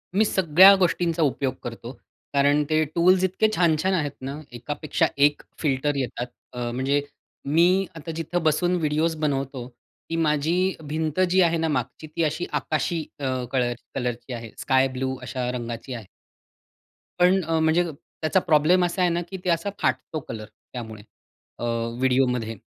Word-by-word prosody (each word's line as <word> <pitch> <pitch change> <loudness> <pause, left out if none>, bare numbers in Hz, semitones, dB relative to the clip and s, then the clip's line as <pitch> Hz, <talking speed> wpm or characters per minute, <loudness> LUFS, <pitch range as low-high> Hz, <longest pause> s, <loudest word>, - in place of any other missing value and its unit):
मी 215 - +4
सगळ्या 190 0 +7
गोष्टींचा 170 -2 +1
उपयोग 135 -2 0
करतो. 120 0 -7 0.4
कारण 145 +1 +3
ते 155 0 +3
टूल्स 185 +2 +4
इतके 190 +4 +2
छान-छान 175 +2 +2
आहेत 150 -5 0
ना 140 +3 -5
एकापेक्षा 145 +5 -1
एक 145 +1 +3 0.2
फिल्टर 145 -1 0
येतात. 125 -2 -3 0.3
अ, 120 -1 -3
म्हणजे 135 +3 +1 0.4
मी 175 +6 +3
आता 165 +1 -6
जिथं 165 +1 -2
बसून 175 +4 +2
व्हिडिओज 160 0 0
बनवतो. 135 -3 -2 0.4
ती 165 - -2
माझी 165 +4 +1
भिंत 155 +2 -2
जी 185 +1 +4
आहे 170 -1 +3
ना 160 0 0
मागची 155 +1 -3
ती 160 +2 -2
अशी 155 +3 -1
आकाशी 160 +2 -1 0.2
अ, 140 - -3 0.3
कलर 125 -2 +1 0.2
कलरची 125 0 -3
आहे. 115 -2 -7
स्काय 130 -1 +3
ब्लू 130 0 -1
अशा 125 0 -3
रंगाची 120 +1 -5
आहे. 115 -4 -7 1.1
पण 185 +2 +5
अ, 165 0 0
म्हणजे 160 +2 +3 0.4
त्याचा 155 +4 +3
प्रॉब्लेम 175 +2 +4
असा 180 +2 -2
आहे 180 - +4
ना, 170 +1 0
की 190 +2 -7
ते - - +1
असा 170 +4 +1
फाटतो 155 - -1
कलर 110 -1 -6 0.3
त्यामुळे 110 -4 -7 0.6
अ, - - -5 0.4
व्हिडिओमध्ये. 125 -3 +1
150 Hz, 155 wpm, -24 LUFS, 130-170 Hz, 1.1 s, सगळ्या